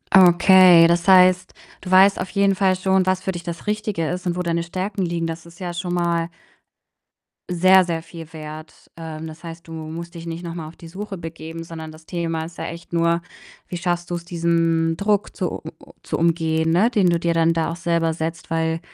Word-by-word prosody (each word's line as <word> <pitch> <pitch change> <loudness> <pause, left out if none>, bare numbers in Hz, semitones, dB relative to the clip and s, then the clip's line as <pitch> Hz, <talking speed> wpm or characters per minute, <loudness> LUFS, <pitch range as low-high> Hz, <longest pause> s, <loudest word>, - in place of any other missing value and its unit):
Okay, 180 -1 +7
das 170 +1 +1
heißt, 185 -1 +5 0.3
du 185 - -8
weißt 190 +1 +5
auf 185 - -4
jeden 200 +1 +2
Fall 190 -1 +2
schon, 190 0 +1
was 185 0 +1
für 190 - -1
dich 175 - -6
das 170 +2 -7
Richtige 210 -6 -2
ist 180 +1 -4
und 175 - 0
wo 180 - -2
deine 170 -1 0
Stärken 190 +3 -4
liegen. 170 -1 -2
Das 165 0 -6
ist 170 +3 -16
ja 175 -2 -4
schon 175 0 -3
mal 170 -1 0 1.2
sehr, 185 +2 +5
sehr 165 -2 -3
viel 165 -1 -11
wert. 155 0 -10
Ähm, 160 -1 -7
das 155 +1 -11
heißt, 165 0 -9
du 165 - -9
musst 165 +2 -7
dich 165 - -8
nicht 170 +1 -6
noch 170 - -6
mal 165 -2 -6
auf 160 - -13
die 165 - -12
Suche 195 +2 -7
begeben, 165 0 -8
sondern 160 -1 -8
das 155 0 -16
Thema 165 -2 -3
ist 165 - -12
ja - - -5
echt 170 +1 -10
nur: 170 0 +2 0.5
Wie - - -6
schaffst 175 0 -2
du's, 175 -1 -3
diesen 165 -1 +1
Druck 205 +2 0
zu - - -3
u - - -6 0.3
zu - - -3
umgehen, 160 -1 +1
ne, 190 +8 +4
den 200 -7 +2
du 170 - +1
dir 170 0 0
dann 165 0 +3
da 165 -1 0
auch - - -4
selber 170 -1 0
setzt, 160 0 -5
weil 165 0 0
170 Hz, 215 wpm, -21 LUFS, 165-180 Hz, 1.2 s, Okay